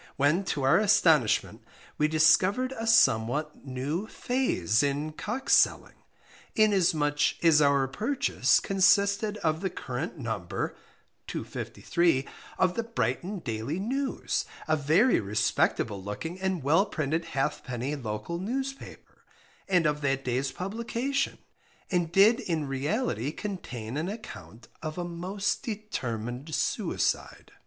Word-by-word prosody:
_ - - -21
when 150 +7 +2
to 145 -7 -2
our 135 +8 +5
astonishment 160 - +3 0.4
we 150 - +4
discovered 185 +11 +3
a 225 -1 -4
somewhat 150 - +3
new 140 +10 -3
phase 225 - 0
in 145 +2 -1
"Cock" 260 +11 -5
selling, - - +3 0.6
inasmuch 170 -9 +3
as 155 -2 +6
our 140 -2 +3
purchase 230 - +1
consisted 200 +2 +2
of 160 0 +1
the 190 - -1
current 140 +2 -5
number 110 - -3 0.5
(253) 170 -6 -1 0.3
of 185 -1 +2
the 230 - -1
Brighton 200 - -2
Daily 115 +6 -3
News 265 +7 -2 0.2
a 155 - +3
very 160 - +3
respectable 105 0 0
looking 160 - -5
and 190 -5 -1
well 165 +9 +3
printed 160 -1 -2
Halfpenny 135 -1 -2
Local 125 +6 -4
Newspaper, 265 +7 -6 0.4
and 180 -3 +3
of 150 0 +1
that 135 -1 0
day's 130 +2 -1
publication, 235 - -2 0.5
and 175 -3 0
did 210 +6 +5
in 165 - -2
reality 135 - -1
contain 135 - -6
an 165 +4 -2
account 205 - -9
of 155 0 -5
a 175 - -2
most 185 +4 -2
determined 135 - -4
suicide. - - -1
160 Hz, 120 wpm, -28 LUFS, 135-200 Hz, 0.6 s, as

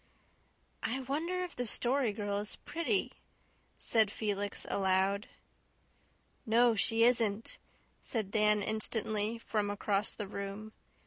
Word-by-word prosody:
"I 260 +4 -1
wonder 325 +8 -2
if 360 - -7
the 245 -1 -2
Story 250 +1 +2
Girl 205 -1 -2
is 210 0 -3
pretty," 335 +4 -1 0.7
said 220 -3 +3
Felix 205 -1 -2
aloud. 195 +1 +1 1.2
"No, 235 +1 +4
she 225 +2 +2
isn't," 230 -3 +2 0.4
said 215 -5 -3
Dan 210 -1 +4
instantly, 220 0 0
from 210 -2 -2
across 205 0 -1
the 210 - -4
room. 200 +2 -6
215 Hz, 115 wpm, -32 LUFS, 205-235 Hz, 1.2 s, No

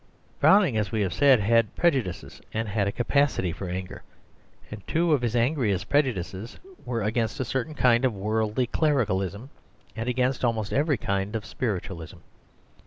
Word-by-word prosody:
Browning, 185 - +5
as 105 -2 -1
we 110 - 0
have 95 -4 -1
said, 135 0 +5
had 115 +1 +2
prejudices, 130 - -1
and 110 0 -2
had 100 -1 0
a - - 0
capacity 125 -5 +1
for 90 +2 -6
anger, 90 +1 -5 0.7
and 110 -1 -7
two 165 0 +2
of 140 - +2
his 120 -1 -1
angriest 120 - 0
prejudices 115 - -1 0.3
were 115 -3 -2
against 115 +5 -1
a 130 - -1
certain 135 +5 -3
kind 125 -2 +3
of 130 - +3
worldly 110 +4 0
clericalism, 115 - -1 0.4
and 115 +1 -3
against 125 +1 0
almost 110 -3 0
every 145 0 +2
kind 100 +1 -2
of 110 -1 -3
spiritualism. 95 -7 -4
115 Hz, 160 wpm, -26 LUFS, 100-130 Hz, 0.7 s, Browning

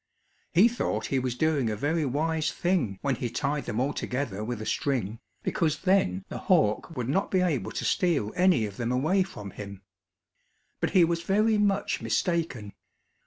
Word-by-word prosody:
He 190 +7 +6
thought 240 0 -2
he 135 - +3
was 125 -1 -2
doing 145 -4 +1
a 105 - -1
very 150 +7 0
wise 155 +3 0
thing 175 - 0
when 140 -1 +1
he 120 - -2
tied 140 +3 -2
them 115 -1 -2
all 140 +3 0
together 125 -6 -3
with 120 0 -4
a 110 - -5
string, 115 -6 -1 0.2
because 155 -2 0
then 190 0 +2
the - - -6
hawk 165 - +1
would 120 -2 -2
not 190 +9 0
be 185 - +2
able 165 -8 0
to - - -3
steal 160 - +1
any 180 -11 +4
of 100 -1 -8
them 120 0 -1
away 155 +10 +2
from 105 - -5
him. 100 -2 -9 1.0
But - - 0
he 180 - +7
was 170 0 +1
very 210 +4 +2
much 205 -1 +1
mistaken. 160 - -1
145 Hz, 180 wpm, -27 LUFS, 120-180 Hz, 1.0 s, he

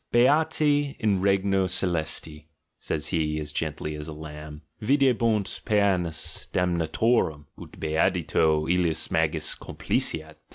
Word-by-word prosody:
"Beati 145 +2 +3
in 100 -4 +1
regno 95 -1 +2
celesti," 80 -3 -2 0.3
says 75 - -3
he, 75 -3 0
as 75 -1 -5
gently 75 0 -3
as 75 0 -6
a 80 - -6
lamb, 75 0 -9 0.2
"videbunt 115 -5 +1
pcenas 95 -6 0
damnatorum, 85 -1 +1 0.2
ut - - -12
beatitudo 80 -1 +1
Mis 80 -3 -1
magis 80 -1 0
complaceat." 80 -1 -2
85 Hz, 110 wpm, -26 LUFS, 75-100 Hz, 0.3 s, Beati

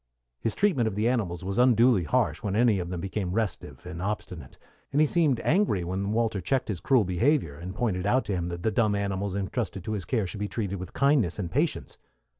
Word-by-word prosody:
His 110 - -1
treatment 170 - +2
of 105 - -3
the 105 +3 +1
animals 100 -9 -1
was 100 +5 -2
unduly 120 -5 +4
harsh - - +1
when 100 -1 -2
any 115 -3 +3
of 85 -1 -4
them 90 -2 -4
became 95 -1 -3
restive 110 -3 -3
and 90 -1 -6
obstinate, 90 -7 -5 0.3
and 140 - +1
he 155 - +6
seemed 150 -6 +2
angry 165 - +2
when 95 +3 -2
Walter 110 -3 0
checked 130 +7 0
his 95 -5 -2
cruel 135 -6 +3
behavior, 100 - +1
and 90 +5 -7
pointed 100 -5 -1
out 125 +2 +2
to 100 - -2
him 90 -2 -2
that 85 0 -5
the 110 - +1
dumb 105 -1 +2
animals 100 -1 -2
intrusted 100 -1 -3
to 110 - -4
his 100 -4 -3
care 115 -6 0
should 100 +3 -6
be 105 - -1
treated 100 -4 -3
with 90 -1 -8
kindness 140 - +2
and 90 -5 -4
patience. - - -1
100 Hz, 225 wpm, -27 LUFS, 90-120 Hz, 0.3 s, he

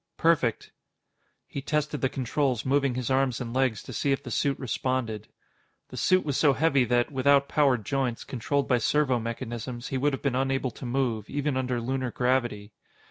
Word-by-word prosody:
"Perfect." 155 -9 +1 0.7
He 140 - -6
tested 150 +1 -1
the 130 - +2
controls, 130 -1 -1
moving 135 -1 +2
his 125 +1 -2
arms 130 -3 +1
and 120 -2 -5
legs 130 -5 +1
to - - -9
see 140 - 0
if 135 +1 0
the 125 - -7
suit 140 +4 +1
responded. 125 -4 -2 0.6
The - - -9
suit 185 -2 +3
was 145 -3 -1
so 145 -3 +4
heavy 140 -4 +3
that, 120 +2 +1
without 140 +1 +3
powered 135 -9 +2
joints, 130 -3 -1
controlled 140 +3 -1
by 125 -2 +3
servomechanisms, 120 -2 -1
he 135 - -1
would 145 +2 +1
have 135 - -4
been 140 -3 +1
unable 135 0 0
to 125 - -8
move, 120 -4 -1
even 145 0 -1
under 125 -2 -1
Lunar 130 +2 -2
gravity. 120 -5 -1
130 Hz, 180 wpm, -27 LUFS, 120-140 Hz, 0.7 s, so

